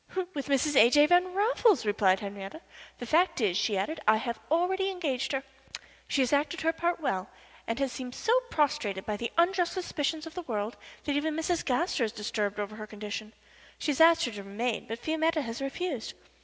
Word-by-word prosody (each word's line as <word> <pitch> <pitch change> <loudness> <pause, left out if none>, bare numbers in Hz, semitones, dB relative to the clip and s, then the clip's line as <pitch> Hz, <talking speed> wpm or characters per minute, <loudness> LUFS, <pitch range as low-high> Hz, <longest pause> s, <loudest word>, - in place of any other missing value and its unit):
"With 280 -1 -4
Mrs. 280 +1 +1
A. 235 -2 +8
J. 295 +3 +6
Van 355 +3 +4
Raffles," 430 - +3
replied 200 -2 +3
Henriette. 200 - -7 0.3
"The 245 - -6
fact 335 +8 +2
is," 205 -7 +1
she 205 +1 +1
added, 305 +12 -2
"I 215 0 +6
have 235 0 -3
already 375 +4 +1
engaged 310 -9 -2
her. 270 -1 -1 0.6
She 275 - +2
has 255 - -1
acted 300 +6 +1
her 325 -1 +2
part 340 +1 -1
well, 190 - -2 0.4
and 230 - -1
has 275 -2 0
seemed 250 -1 -6
so 455 - +1 0.2
prostrated 265 -11 0
by 210 - -2
the 235 +3 -4
unjust 350 0 +3
suspicion 320 -4 -2
of 325 - -9
the 360 - -4
world 220 -7 -3 0.3
that 290 - -1
even 305 +1 0
Mrs. 330 +2 0
Gaster 280 +1 0
is 220 - 0
disturbed 210 -2 -2
over 210 +1 -4
her 215 -1 -7
condition. 215 0 -6 0.4
She 300 - -1
has 285 - 0
asked 330 0 +7
her 245 - -3
to 205 -2 -7
remain, 215 +4 -3
but 225 - -4
Fiametta 320 +3 0
has 230 +1 -5
refused. 275 -2 -3
275 Hz, 200 wpm, -29 LUFS, 215-325 Hz, 0.6 s, A